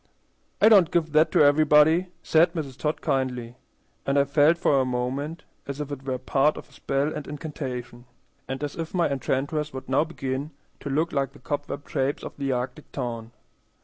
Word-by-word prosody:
"I - - +6
don't 195 -7 +7
give 160 -2 0
that 155 +2 +4
to - - +6
everybody," 155 +4 +5 0.2
said 165 +2 +4
Mrs. 145 -7 -4
Todd 150 +2 -2
kindly; 125 -3 -1 0.5
and 140 +1 0
I 140 - +6
felt 145 +4 +4
for 140 -5 +3
a - - +2
moment 130 +6 -3 0.2
as 140 0 -5
if 145 -1 -4
it 140 -2 -5
were 130 -1 -2
part 135 +3 +1
of - - -9
a - - -26
spell 140 +3 -1
and 150 - -6
incantation, 130 -5 -6 0.4
and 135 +2 -4
as 145 - -4
if 165 +2 -5
my 175 - +3
enchantress 140 +2 -2
would 130 0 -7
now 135 +3 +3
begin 140 -3 -4 0.3
to 140 - -6
look 155 +5 0
like 135 -1 -1
the 145 - -15
cobweb 145 -1 -4
shapes 135 +2 -1
of - - -7
the 140 -1 -1
arctic 130 +4 -4
town. 115 -4 -5
145 Hz, 190 wpm, -25 LUFS, 130-155 Hz, 0.5 s, don't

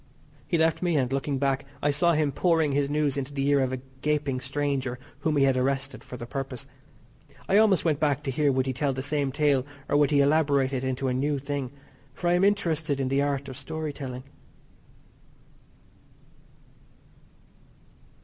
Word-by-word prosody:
He 170 - +1
left 160 0 +2
me, 175 -3 +1
and, 130 -1 0
looking 135 0 -1
back, 135 0 0 0.2
I 145 - +1
saw 170 +4 +3
him 150 -2 +1
pouring 160 0 +2
his 140 0 +1
news 150 -2 +1
into 140 +1 -4
the 135 0 0
ear 145 -1 +4
of 130 -1 +1
a 130 - -2 0.2
gaping 145 -3 0
stranger 135 -2 -2 0.2
whom 155 -2 0
he 140 - +4
had 135 -1 +3
arrested 135 +1 -1
for 125 - -8
the 120 - -7
purpose. 135 0 -5 0.8
I 195 - +4
almost 210 -5 +4
went 155 -3 +2
back 145 -2 +1
to 135 - -2
hear 145 +2 +2
would 130 -1 +1
he 130 - -1
tell 140 +1 0
the 130 0 -4
same 145 -1 0
tale 145 -2 +2 0.2
or - - 0
would 145 -1 +4
he 145 -2 +4
elaborate 140 -2 +2
it 130 -1 -2
into 130 0 -1
a 125 - +1
new 140 +3 0
thing, 140 -1 -3 0.5
for 175 - -1
I - - +4
am 180 +1 +3
interested 165 -8 +1
in 130 -1 0
the 135 +1 +2
art 140 -1 -1
of 130 - -7
story 155 +2 -5
telling. 130 -3 -6
140 Hz, 190 wpm, -26 LUFS, 135-150 Hz, 0.8 s, ear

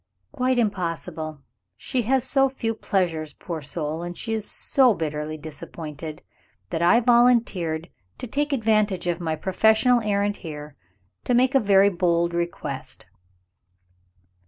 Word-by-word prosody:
"Quite 255 -2 0
impossible. 165 - -2 0.3
She 250 - -1
has 265 -2 +3
so 270 +1 +2
few 230 -4 -2
pleasures, 170 -8 -1
poor 165 -3 -6
soul, 150 +2 -4
and 175 0 -6
she 225 - -3
is 215 -1 -3
so 255 -5 +3
bitterly 155 -1 -3
disappointed, 155 0 -8 0.5
that 165 -1 -1
I 175 +7 +5
volunteered 230 -10 +3 0.3
to - - -6
take 290 +5 -1
advantage 215 -7 +1
of 175 -1 -1
my 160 -2 -1
professional 220 +8 +3
errand 205 -1 0
here, 150 -3 -8 0.5
to 245 - +2
make 255 +3 +3
a 270 - +5
very 200 -3 +5
bold 170 -2 +1
request. 150 -7 -4
180 Hz, 135 wpm, -24 LUFS, 160-230 Hz, 0.5 s, I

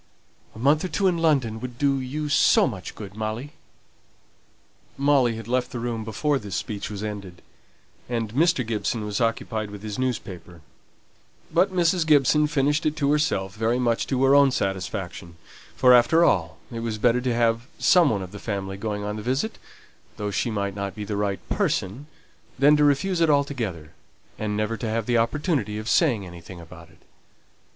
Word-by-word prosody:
A - - -11
month 140 +6 +2
or - - -1
two 195 +2 -1
in 180 -3 +2
London 135 -9 +1
would 120 0 -7
do 140 0 +1
you 145 +4 -4
so 145 - +4
much 100 -8 -6
good, 100 -2 -9
Molly." 110 +6 -4 1.5
Molly 135 -4 +3
had 115 -1 -8
left 125 +1 0
the - - -6
room 115 -1 -3
before 135 +7 -1
this 100 -6 -6
speech 100 +3 -4
was 105 -1 -6
ended, 100 -5 -7 0.7
and 115 -3 -2
Mr. 155 -2 +2
Gibson 110 0 -2
was 105 +1 -3
occupied 110 -2 -1
with 105 0 -10
his 105 +2 -5
newspaper; 95 -9 -4 0.9
but 180 +3 +3
Mrs. 175 -2 +1
Gibson 150 0 +4
finished 150 0 +1
it 155 - -1
to 140 -2 +1
herself 125 -11 0
very 115 +3 0
much 120 -2 0
to 130 -1 0
her 135 +1 +5
own 140 -1 +6
satisfaction; 95 -5 -4 0.4
for, 125 -1 +6
after 160 +8 +5
all, 80 - +1
it 115 - -5
was 115 -2 -3
better 120 +2 +2
to 125 -2 -1
have 115 +1 +1
some 175 -4 +5
one 100 -3 -1
of 90 - -9
the 105 - -9
family 95 -2 -4
going 105 0 -3
on 105 +1 -4
the - - -5
visit, 135 - -2 0.6
though 105 -1 -3
she 115 - -1
might 100 -2 -2
not 100 -1 -5
be 105 - -5
the 105 - -3
right 100 -1 -2
person, 120 +11 -1 0.5
than 145 +3 +5
to 150 - +3
refuse 170 +6 +2
it 165 - +4
altogether, 120 - -1 0.5
and 105 -1 -2
never 110 +1 -1
to 115 - -4
have 115 0 -1
the 120 0 +2
opportunity 120 - -1
of 110 +1 -6
saying 125 - +2
anything 85 0 -11
about 85 0 -13
it. 80 - -24
115 Hz, 185 wpm, -24 LUFS, 105-140 Hz, 1.5 s, own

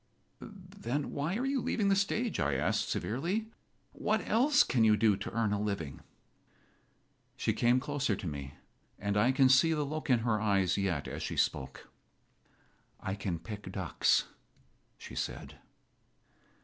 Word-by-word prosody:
"Then 185 - -5
why 150 +6 -2
are 255 - -1
you 270 -1 0
leaving 205 -4 0
the 195 - +4
stage?" 215 +4 0
I 70 -1 +1
asked, 65 - 0
severely. 185 - -2 0.4
"What - - -1
else 275 +6 +4
can 120 -3 +1
you 110 -1 +5
do 105 -1 +4
to 100 - -5
earn 115 -3 0
a 105 - -1
living?" 100 -10 -3 1.4
She - - 0
came 120 +2 +3
closer 140 -5 -1
to 95 - -8
me, 70 -3 -5 0.4
and 100 0 -2
I 110 +5 +4
can 135 0 +4
see 135 +6 +5
the 150 -1 0
look 155 +1 -5
in 120 -3 +4
her 110 -2 0
eyes 95 -4 +2
yet 95 -7 -1
as - - -5
she - - -4
spoke. 65 - -1 1.1
"I 95 - -3
can 95 -3 -3
pick 105 +4 -8
ducks," - - +2 0.7
she - - -11
said. - - -5
120 Hz, 155 wpm, -31 LUFS, 100-165 Hz, 1.4 s, you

